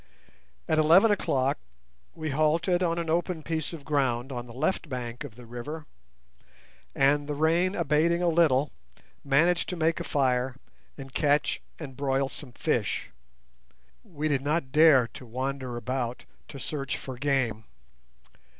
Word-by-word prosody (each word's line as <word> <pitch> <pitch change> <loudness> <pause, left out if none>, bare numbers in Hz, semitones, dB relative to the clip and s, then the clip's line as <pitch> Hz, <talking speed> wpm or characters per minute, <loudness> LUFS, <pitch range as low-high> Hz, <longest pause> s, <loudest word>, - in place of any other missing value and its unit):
At 155 - +2
eleven 170 +8 +6
o'clock 135 - +1 0.6
we 155 -2 -3
halted 160 +5 +2
on 170 -2 +1
an 170 -1 -2
open 165 0 -1
piece 160 -1 -2
of 160 -5 -9
ground 135 -4 0
on 120 -1 -5
the - - -11
left 145 +6 -1
bank 125 0 -5
of 135 -7 -9
the 125 0 -12
river, 145 +7 -7 1.1
and, 145 +1 +3
the 150 - -2
rain 170 +5 +2
abating 165 +1 +2
a - - +3
little, 155 -5 +3 0.5
managed 165 +6 +2
to 180 - -3
make 165 0 +1
a - - -3
fire 130 -4 +1 0.4
and 135 -2 -9
catch 145 +1 +1 0.2
and 140 -5 -8
broil 135 -1 0
some 135 -4 -9
fish. - - -1 0.9
We 155 -2 -3
did 140 -3 +1
not 145 -1 -1
dare 150 -4 +6
to - - -11
wander 130 +1 -3
about 125 0 -3 0.2
to 140 - -9
search 140 -1 -3
for 130 - -7
game. 125 -5 0
145 Hz, 150 wpm, -27 LUFS, 130-160 Hz, 1.1 s, eleven